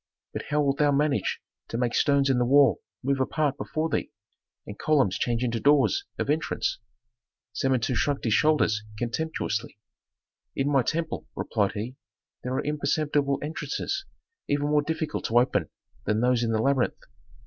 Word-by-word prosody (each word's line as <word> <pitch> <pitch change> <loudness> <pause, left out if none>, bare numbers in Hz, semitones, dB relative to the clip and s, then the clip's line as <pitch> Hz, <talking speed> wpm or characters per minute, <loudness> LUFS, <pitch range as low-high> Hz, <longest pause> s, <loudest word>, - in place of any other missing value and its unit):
But - - -5
how 150 0 +2
wilt 140 -1 0
thou 145 -1 +4
manage 145 0 +1 0.3
to 115 - -4
make 120 -1 0
stones 140 -1 +3
in 130 -2 +2
the 120 - +2
wall 135 -6 +5 0.2
move 135 +1 +1
apart 145 +1 0
before 155 +2 -2
thee, 160 - -2 0.6
and 105 - -9
columns 135 -11 +2
change 120 0 0
into 115 -2 0
doors 145 - +3
of - - -2
entrance?" 150 -4 -1 0.7
Samentu 130 0 +1
shrugged 140 +3 0
his 115 - +1
shoulders 150 -7 +3 0.2
contemptuously. 120 -3 -3 0.8
"In 140 +1 0
my 135 -2 +4
temple," 165 +4 -2
replied 100 -3 0
he, 115 +5 -5 0.4
"there 125 +1 -3
are - - -1
imperceptible 145 -1 0
entrances 155 - -3 0.5
even 145 0 +1
more 150 0 +4
difficult 155 0 -3
to 115 - +2
open 125 +2 +2 0.4
than 105 - +1
those 125 0 +2
in 115 - 0
the 110 - +1
labyrinth. 135 -2 +1
140 Hz, 160 wpm, -26 LUFS, 120-150 Hz, 0.8 s, wall